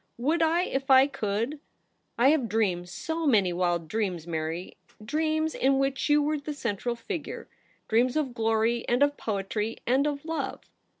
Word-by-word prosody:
' - - -47
Would 335 0 +1
I 330 +2 +3
if 270 -5 -3
I 265 0 +8
could 230 +2 -2 0.3
} - - -47
I 245 +3 +5
have 280 -7 +2
dreamed 185 -5 0
so 320 - -3
many 200 -9 +3
wild 175 -2 0
dreams, 185 -5 -2
Mary 165 +1 -4
— 215 - -17
dreams 315 0 +1
in 270 +1 +2
which 270 +1 0
you 295 0 +4
were 300 0 0
the 295 +1 -6
central 235 -1 -2
figure 330 - -6 0.2
— - - -37
dreams 240 +3 +2
of 275 -5 -1
glory 225 +1 +1
and 245 +3 +4
of 285 0 +2
poetry, 210 0 -3
and 265 +4 +2
of 290 0 -3
love.' 325 0 -3
245 Hz, 185 wpm, -27 LUFS, 210-295 Hz, 0.3 s, I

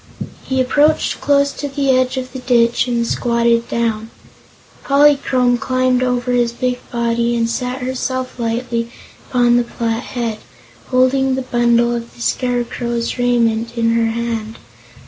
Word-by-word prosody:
He 265 0 -2
approached 295 +4 +2
close 280 0 +2
to 290 - -5
the 275 -1 0
edge 255 +1 +1
of 255 -1 -5
the 260 - -5
ditch 240 -1 +2
and 235 -1 0
squatted 235 -1 +1
down. 225 -1 -1 0.7
Polychrome 275 -3 +3
climbed 255 0 +1
over 250 0 0
his 240 -1 +1
big 250 0 -2
body 235 0 0
and 230 0 +1
sat 250 +2 -3
herself 255 0 -3
lightly 235 0 -2 0.4
upon 240 -1 +3
the 245 - +2
flat 230 -1 -3
head, 235 -4 -4 0.5
holding 260 +1 +2
the 265 - -3
bundle 240 -1 +2
of 235 0 -6
the 235 - -13
Scarecrow's 240 -1 -2
raiment 235 -1 +1
in 230 0 +2
her 230 0 +2
hand. 225 -1 -3
245 Hz, 145 wpm, -17 LUFS, 235-255 Hz, 0.7 s, Polychrome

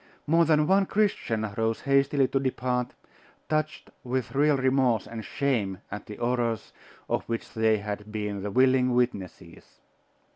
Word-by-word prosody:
More 165 +2 +4
than 155 -1 +3
one 195 +3 +3
Christian 120 - 0
rose 115 0 0
hastily 140 0 +3
to 135 - +1
depart, 125 -2 -2 0.5
touched 155 0 -2
with 130 -2 -3
real 145 +1 +3
remorse 130 -4 +2
and 115 -1 -7
shame 115 -10 -1
at 105 - -7
the 105 - -7
horrors 120 -2 -1 0.3
of - - -1
which 115 0 -5
they 110 -1 +3
had 105 +1 -6
been 105 -2 -3
the 105 - -3
willing 130 +2 +3
witnesses. 120 -7 -3
125 Hz, 145 wpm, -27 LUFS, 110-140 Hz, 0.5 s, More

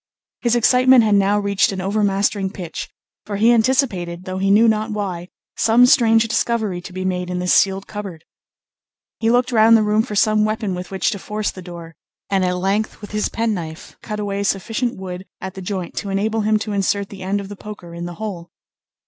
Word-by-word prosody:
His 240 -1 +2
excitement 250 +1 +5
had 215 -1 +2
now 200 +1 +3
reached 200 -1 +1
an 190 - -5
overmastering 200 0 0
pitch; 180 -4 -7 0.4
for 205 - -3
he 225 +3 +5
anticipated, 220 -8 0
though 185 0 -4
he 195 +1 +1
knew 215 +4 +5
not 220 0 +1
why, 190 -5 -4 0.3
some 230 +2 +5
strange 225 -2 +4
discovery 220 -4 -1
to 185 - -10
be 185 +1 -5
made 180 -1 -2
in 180 - -3
this 180 0 +1
sealed 195 0 +3
cupboard. 195 -6 -8 0.9
He 225 - +1
looked 245 +2 +2
round 225 0 +6
the 215 - +2
room 210 +1 +2
for 220 -2 -5
some 215 +1 +3
weapon 215 -2 -1
with 180 0 -6
which 190 -2 0
to 200 - -4
force 210 +2 -3
the 185 - -10
door, 170 -2 -10 0.4
and 195 -1 +2
at 180 0 0
length 195 +4 -1
with 205 - -10
his 210 0 -1
penknife 185 -8 -4
cut 210 -2 -5
away 200 -1 -2
sufficient 220 +5 -1
wood 185 0 -7
at 190 -1 -6
the 190 - -8
joint 185 -2 -5
to 200 - -3
enable 215 +3 0
him 215 +1 +2
to 210 0 -4
insert 200 0 0
the 195 -2 -10
end 195 +2 -1
of 200 - -7
the 205 - -8
poker 200 -5 -10
in 170 0 -6
the 175 0 -7
hole. 180 -4 -6
200 Hz, 210 wpm, -20 LUFS, 185-220 Hz, 0.9 s, round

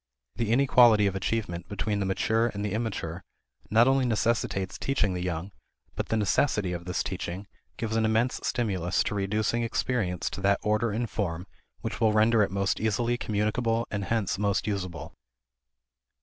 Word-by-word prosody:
The 115 -2 0
inequality 120 -4 +5
of 100 -1 0
achievement 95 -3 -2
between 105 +1 -2
the 100 - -1
mature 110 +4 +1
and 105 -3 -4
the 105 - -2
immature 95 -6 -3 0.5
not 115 +4 +5
only 135 0 +3
necessitates 110 -5 0
teaching 120 -8 0
the 90 - -3
young, 90 +1 -3 0.4
but - - -3
the 110 - +1
necessity 105 -2 +1
of 85 0 -5
this 90 +1 -1
teaching 95 +1 -5 0.3
gives 110 -1 -2
an 115 - +2
immense 110 +3 +1
stimulus 95 -7 0
to - - -3
reducing 105 +4 0
experience 115 -6 -1
to - - -6
that 100 0 +3
order 105 +2 +1
and 115 +3 -2
form 90 -4 -3 0.4
which - - -5
will 110 -2 +4
render 110 +1 +4
it 100 - +2
most 100 +1 0
easily 115 +2 +1
communicable 115 +1 0
and 100 -1 -2
hence 105 -4 -1
most 100 -1 +1
usable. 90 -6 -4
105 Hz, 165 wpm, -27 LUFS, 95-115 Hz, 0.5 s, inequality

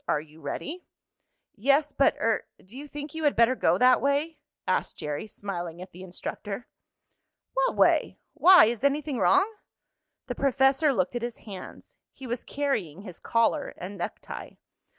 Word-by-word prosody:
Are - - +2
you 155 +1 -14
ready?" 310 - -5 0.7
"Yes, 280 +6 +2
but 275 - +2
er 225 -1 0
do 195 +6 -16
you 290 +2 -8
think 290 0 -7
you 320 0 -5
had 290 - +3
better 235 +2 +5
go - - +2
that 255 0 +5
way?" 285 +4 0 0.3
asked - - 0
Jerry, 150 +5 -4
smiling 175 -5 -6
at 185 +1 -9
the 180 - -12
instructor. 195 +4 -6 0.9
"What - - +1
way? - - +3 0.2
Why, 365 -5 +8
is 230 +1 -2
anything 280 -2 0
wrong?" 380 +1 +4 0.8
The - - -4
professor 270 +2 +3
looked 185 -2 -1
at 240 - -2
his 240 -1 -4
hands. 195 -4 -11 0.2
He 265 - -11
was 240 0 -4
carrying 220 - -2
his 180 -5 -10
collar 230 +6 0
and 185 +3 -7
necktie. 175 - -6
245 Hz, 160 wpm, -27 LUFS, 190-285 Hz, 0.9 s, Why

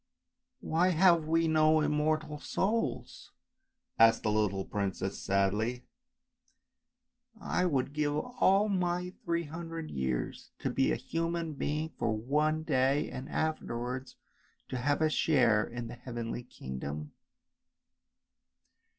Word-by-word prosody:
" - - -57
Why 170 +3 +2
have 170 -2 +4
we 165 +1 +2
no 155 0 +4
immortal 150 0 0
souls? 215 +9 -2 0.3
" 260 -1 -42
asked 115 0 +6
the 105 - +1
little 105 -3 0
mer 100 -1 +1
maid 95 - -4 0.2
sadly. 105 +5 0 0.8
" 245 -2 -33
I 180 -2 0
would 140 -3 0
give 150 -1 0
all 200 +2 +2
my 180 -2 -1
three 170 0 0
hundred 165 0 -6
years 65 -2 -3
to - - -2
be - - +2
a - - +2
human 165 -1 -2
being 150 +2 -2
for - - +1
one 150 +7 +1
day, 135 0 +1
and 130 +1 -6
afterwards 130 -4 -3 0.5
to 130 - -3
have 145 +4 +1
a 155 - +4
share 120 -10 +3
in 120 0 -6
the 115 - -8
heavenly 120 -1 -5
kingdom." 75 - -6
150 Hz, 130 wpm, -31 LUFS, 120-170 Hz, 0.8 s, asked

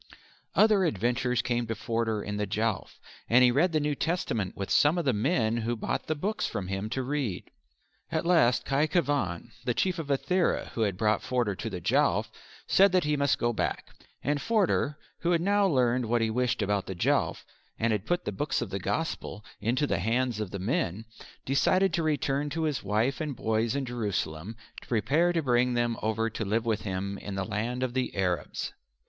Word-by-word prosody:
Other 210 -3 +5
adventures 125 - 0
came 120 -1 -1
to 115 - -2
Forder 115 -1 -1
in 105 0 -4
the 105 0 -1
Jowf, 110 +1 -2 0.3
and 125 +2 +6
he 125 - +6
read 160 +8 +3
the 155 - +2
New 150 0 0
Testament 135 - -2
with 100 - -4
some 150 +4 +4
of 170 - -1
the 130 - +3
men 115 0 +1
who 120 +1 -1
bought 110 - -3
the 155 - 0
books 200 +8 -1
from 95 -2 -4
him 100 +2 -3
to 130 +3 -2
read. 130 -8 -3 0.6
At - - -1
last 165 -9 +4
Khy 145 +3 +2
Khevan, 140 - 0
the 125 -1 0
Chief 185 -2 0
of 160 - -4
Ithera, 175 +6 +1
who 115 - -3
had 100 -4 +1
brought 105 +1 +2
Forder 120 -5 0
to 115 +4 -5
the 95 -4 -5
Jowf, - - +2 0.3
said 195 0 +5
that 185 -1 +4
he 150 0 +1
must 140 -1 +2
go 120 0 0
back, - - -2 0.3
and 145 +1 0
Forder, 195 -9 +1 0.2
who 175 +1 +1
had 165 - +2
now 200 +2 +3
learned 125 -6 +2
what 120 0 +2
he 110 - 0
wished 125 -2 0
about 100 -1 0
the 95 - -4
Jowf, 85 - 0 0.3
and 115 0 +1
had 105 0 -3
put 175 0 0
the - - -1
books 145 +10 -1
of 120 -5 -4
the 100 - -2
Gospel 105 - -3
into 120 +7 +1
the 100 - 0
hands 115 +3 0
of 105 -3 -3
the 100 - -5
men, 100 0 -1 0.4
decided 185 +8 +3
to 170 - +1
return 145 -2 0
to 160 +3 -2
his 150 -4 -1
wife 110 +8 0
and 150 -3 -3
boys 110 +2 0
in 140 -1 -1
Jerusalem 100 -5 -3 0.2
to - - -16
prepare 135 +10 +2
to 165 -2 0
bring 125 -1 +2
them 120 -1 +1
over 110 +1 0
to 110 0 -4
live 110 +3 0
with 110 -2 0
him 100 0 -3
in 100 - -6
that 95 +1 -3
land 115 +4 -2
of 125 -2 -2
the 130 0 -1
Arabs. 90 -5 -2
120 Hz, 205 wpm, -28 LUFS, 105-145 Hz, 0.6 s, and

